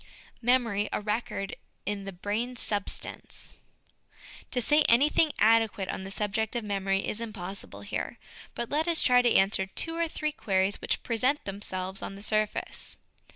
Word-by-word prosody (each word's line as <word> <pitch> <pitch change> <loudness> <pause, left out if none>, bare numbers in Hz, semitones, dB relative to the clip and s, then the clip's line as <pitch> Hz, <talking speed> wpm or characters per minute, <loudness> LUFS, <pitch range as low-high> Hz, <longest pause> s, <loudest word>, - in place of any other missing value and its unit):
Memory 230 -4 +2
a - - 0
Record 210 -2 -2 0.3
in 200 0 -3
the 195 - -4
Brain 210 +7 -2
Substance. 205 -4 -4 1.0
To 250 - -1
say 295 +5 +5
anything 295 +6 +5
adequate 220 -3 +3
on - - -3
the 190 - -6
subject 210 +3 -1
of 235 - -1
memory 195 -1 0
is 215 - -3
impossible 200 -4 -6
here; - - -4 0.4
but 235 - -4
let 310 +3 +1
us 335 -1 +4
try 250 -1 +6
to 240 -1 +3
answer 195 0 +4
two 325 - -2
or 335 0 +1
three 305 -1 -2
queries 195 -7 0
which - - -1
present 255 +5 +1
themselves 190 -1 -4
on 195 - -5
the 200 - -10
surface. 215 0 -2
215 Hz, 155 wpm, -29 LUFS, 195-245 Hz, 1.0 s, try